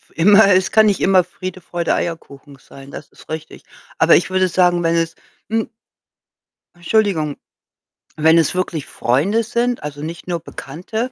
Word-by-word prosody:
Immer 200 +3 +6
es 185 0 +2
kann 220 0 +5
nicht 205 -2 +1
immer 190 -1 +4
Friede, 185 +1 -8
Freude, 170 -1 -2
Eierkuchen 145 -4 -6
sein, 135 +2 -14
das 145 - -10
ist - - -19
richtig. 155 0 -7 0.3
Aber - - +5
ich 175 - +1
würde 185 0 +1
sagen, 175 -1 +2
wenn 165 0 +1
es, 165 -1 -1 0.3
hm 225 0 -1 1.1
Entschuldigung, 175 -5 0 0.8
wenn 160 +2 +4
es 165 +1 +2
wirklich 175 -5 -3
Freunde 170 - 0
sind, 240 -1 -2
also, 145 -1 -7
nicht 165 +3 -7
nur 175 -1 -2
Bekannte, 185 - -6
175 Hz, 155 wpm, -18 LUFS, 155-195 Hz, 1.1 s, Immer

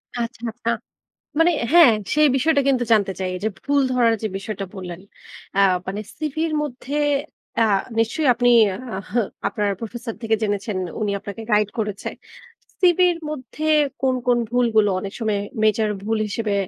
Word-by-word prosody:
আচ্ছা, 235 0 -4
আচ্ছা। 230 0 -4 0.7
মানে 330 +2 +5 0.2
হ্যাঁ, 335 -8 +8 0.2
সেই 300 0 +5
বিষয়টা 285 +2 +3
কিন্তু 250 -3 +2
জানতে 200 -3 +3
চাই। 185 -1 -2
এই 180 - -5
যে - - +3 0.2
ভুল 285 0 +2
ধরার 235 -2 +3
যে 220 - 0
বিষয়টা 195 0 -5
বললেন 180 -2 -7 0.5
অ্যা 200 - +2 0.3
মানে 195 +2 -3 0.2
সিভির 315 +1 -2
মধ্যে 280 0 -5 0.6
অ্যা 225 - +5 0.3
নিশ্চয়ই 260 +6 +1
আপনি 245 +1 +3 0.5
আহ 195 - -8 0.4
আপনার 205 0 -1
প্রফেসর 230 0 -6
থেকে 225 -1 +2
জেনেছেন, 205 -1 -1 0.2
উনি 210 -1 0
আপনাকে 200 +3 -7
গাইড 210 -1 +3
করেছে। 210 -2 -3 0.7
সিভির 355 -1 +4
মধ্যে 300 +1 -5 0.4
কোন, 260 -1 +2
কোন 245 -1 +4
ভুলগুলো 230 -4 +3
অনেক 195 +1 -6
সময়ে 220 -3 0 0.3
মেজর 215 0 +3
ভুল 220 +1 -1
হিসেবে 210 0 -2
225 Hz, 150 wpm, -22 LUFS, 210-265 Hz, 0.7 s, হ্যাঁ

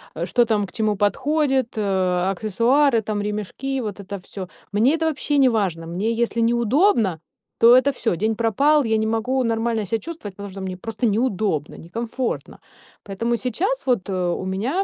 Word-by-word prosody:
э, - - -2
что 240 - +3
там 210 -3 +1
к - - -14
чему 215 -2 0
подходит, 265 +4 +1
э, 185 -2 +1
аксессуары, 230 +6 +2
там, 210 -1 -3
ремешки, 215 +6 -3
вот 205 -2 -5
это 200 +1 -10
всё. 185 0 -8 0.2
Мне 245 +9 +4
это 325 - -6
вообще 290 -1 0
не 265 - +6
важно. 180 -7 -1
Мне 195 +7 -1
если 235 0 0
неудобно, 235 - +2 0.4
то 235 +1 +8
это 255 +2 +4
всё. 225 -8 -1
День 220 +2 0
пропал, 280 +7 +3
я 220 0 +2
не 220 0 0
могу 250 +4 0
нормально 225 -1 0
себя 225 +4 -1
чувствовать, 310 - -8
потому 200 -1 -8
что 195 0 -8
мне 185 -1 -5
просто 225 +3 -2
неудобно, 205 - 0
некомфортно. 230 +8 -4 0.5
Поэтому 230 +4 -1
сейчас 345 - -2
вот, 215 -6 +1
э, - - -2 0.2
у 185 - -4
меня 235 - -1
225 Hz, 180 wpm, -22 LUFS, 200-255 Hz, 0.5 s, то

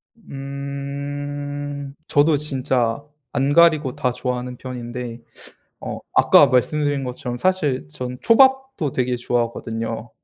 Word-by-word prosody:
음. 140 -2 -5
저도 145 +1 +4
진짜 130 -3 -1 0.3
안 140 +1 +1
가리고 155 -5 +5
다 125 - 0
좋아하는 125 0 -4
편인데 120 -2 -6 0.6
어 - - -5
아까 145 - +7
말씀드린 145 +2 +1
것처럼 125 -1 -4
사실 150 - 0
저는 125 +8 -6
초밥도 265 - +4
되게 125 -1 0
좋아하거든요. 115 -1 -2
140 Hz, 245 characters per minute, -22 LUFS, 125-145 Hz, 0.6 s, 아까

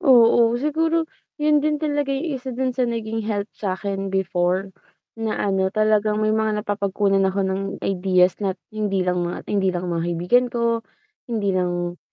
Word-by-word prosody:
Oo, 235 -5 +5
siguro 320 +4 +1 0.3
'yon 300 -1 +3
din 300 0 +1
talaga 290 -2 -1
'yong 275 -1 -2
isa 260 +1 -9
do'n 260 +1 -1
sa 250 -1 0
naging 225 -1 -3
help 205 0 -1
sa'kin 195 0 -3
before 190 0 0 0.5
na 225 -1 -2
ano, 190 -1 +1
talagang 215 0 +2
may 215 - +2
mga 215 -1 0
napapagkunan 200 -1 +1
ako 195 0 0
ng 190 +1 -1 0.2
ideas 185 -1 +3
na 195 -2 -1 0.2
hindi 205 -3 -1
lang 180 0 0
mga 175 0 -3
hindi 195 -2 +2
lang 180 -1 -2
mga 165 0 -1
kaibigan 180 +9 +2
ko, 235 -1 0 0.5
hindi 205 -4 0
lang 175 -1 -1
210 Hz, 165 wpm, -22 LUFS, 190-240 Hz, 0.5 s, Oo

